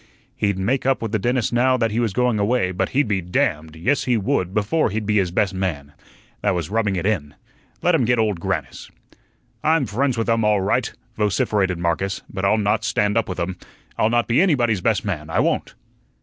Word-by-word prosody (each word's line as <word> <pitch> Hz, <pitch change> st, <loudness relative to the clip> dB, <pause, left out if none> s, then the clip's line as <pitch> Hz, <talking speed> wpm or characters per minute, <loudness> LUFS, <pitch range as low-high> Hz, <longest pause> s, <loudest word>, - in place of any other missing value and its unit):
He'd 100 Hz, -2 st, 0 dB
make 125 Hz, +8 st, 0 dB
up 135 Hz, -, +2 dB
with 115 Hz, -2 st, -4 dB
the 110 Hz, -, 0 dB
dentist 120 Hz, +3 st, 0 dB
now 130 Hz, +2 st, +3 dB
that 115 Hz, -3 st, 0 dB
he 110 Hz, -, -1 dB
was 115 Hz, -3 st, +1 dB
going 125 Hz, +1 st, +1 dB
away, 100 Hz, -2 st, +1 dB
but 90 Hz, -, -1 dB
he'd 140 Hz, -1 st, +1 dB
be 100 Hz, -3 st, 0 dB
damned 85 Hz, -, -1 dB
yes, 125 Hz, -, 0 dB
he 125 Hz, -2 st, +2 dB
would 95 Hz, -3 st, 0 dB
before 105 Hz, +10 st, +1 dB
he'd 105 Hz, +1 st, -3 dB
be 105 Hz, 0 st, +1 dB
his 95 Hz, -3 st, +2 dB
best 95 Hz, +2 st, 0 dB
man. 80 Hz, -7 st, -3 dB, 0.5 s
That 100 Hz, -2 st, +1 dB
was 85 Hz, +1 st, -3 dB
rubbing 105 Hz, -3 st, +1 dB
it 90 Hz, -, -2 dB
in. 80 Hz, -9 st, -1 dB, 0.5 s
Let 175 Hz, -, +3 dB
him 145 Hz, -7 st, +3 dB
get 120 Hz, +1 st, +2 dB
Old 105 Hz, -5 st, 0 dB
Grannis. -, -, -4 dB, 0.7 s
"I'm 160 Hz, -2 st, +3 dB
friends 125 Hz, +4 st, -1 dB
with 115 Hz, -, -1 dB
um 115 Hz, -1 st, +2 dB
all 105 Hz, -1 st, +3 dB
right," 95 Hz, -, 0 dB, 0.3 s
vociferated 100 Hz, -3 st, +1 dB
Marcus, 85 Hz, +3 st, -2 dB
"but 95 Hz, -, -4 dB
I'll 100 Hz, +3 st, +3 dB
not 105 Hz, +1 st, +1 dB
stand 105 Hz, -2 st, +1 dB
up 115 Hz, -3 st, +1 dB
with 90 Hz, -, -4 dB
um. 90 Hz, +1 st, -3 dB, 0.4 s
I'll 110 Hz, -, +2 dB
not 120 Hz, -2 st, +1 dB
be 120 Hz, +7 st, +3 dB
ANYBODY'S 120 Hz, -, +2 dB
best 110 Hz, +2 st, +1 dB
man, 80 Hz, -6 st, -3 dB
I -, -, -2 dB
won't." -, -, 0 dB
105 Hz, 215 wpm, -21 LUFS, 95-120 Hz, 0.7 s, now